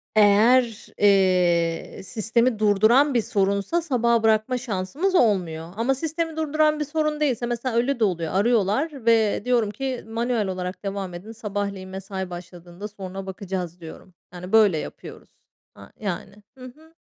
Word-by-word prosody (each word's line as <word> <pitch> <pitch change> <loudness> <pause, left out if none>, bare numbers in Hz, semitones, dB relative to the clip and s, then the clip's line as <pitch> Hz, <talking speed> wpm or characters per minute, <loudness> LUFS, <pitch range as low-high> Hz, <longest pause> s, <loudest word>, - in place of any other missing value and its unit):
Eğer, 220 +3 +4
eee, 180 -5 +2
sistemi 225 +3 0
durduran 220 +7 +4
bir 240 - +3
sorunsa, 200 - 0
sabaha 235 -7 +1
bırakma 220 +3 +2
şansımız 250 - -2
olmuyor. 175 - +1
Ama 235 +5 +1
sistemi 320 +3 -3
durduran 305 0 +1
bir 300 - -1
sorun 305 0 -1
değilse, 260 -6 0
mesela 240 0 -3
öyle 245 +2 +1
de - - +2
oluyor. 170 -5 -1
Arıyorlar 230 - +1
ve 225 -2 +3
diyorum 240 -4 +2
ki, 260 +3 -4
"Manuel 230 -1 -1
olarak 185 0 -5
devam 195 -2 -4
edin 185 +6 -9
sabahleyin 200 -4 -4
mesai 190 0 -6
başladığında, 175 +2 -9
soruna 195 -2 -8
bakacağız" 190 -3 -5
diyorum. 170 +2 -12 0.2
Yani, 180 +1 -8
böyle 210 -6 +5
yapıyoruz. - - -9 0.5
Aaa, 100 0 -14
yani, 200 +1 -5
hı 255 - -10
hı. 315 +6 -15
215 Hz, 145 wpm, -24 LUFS, 190-250 Hz, 0.5 s, böyle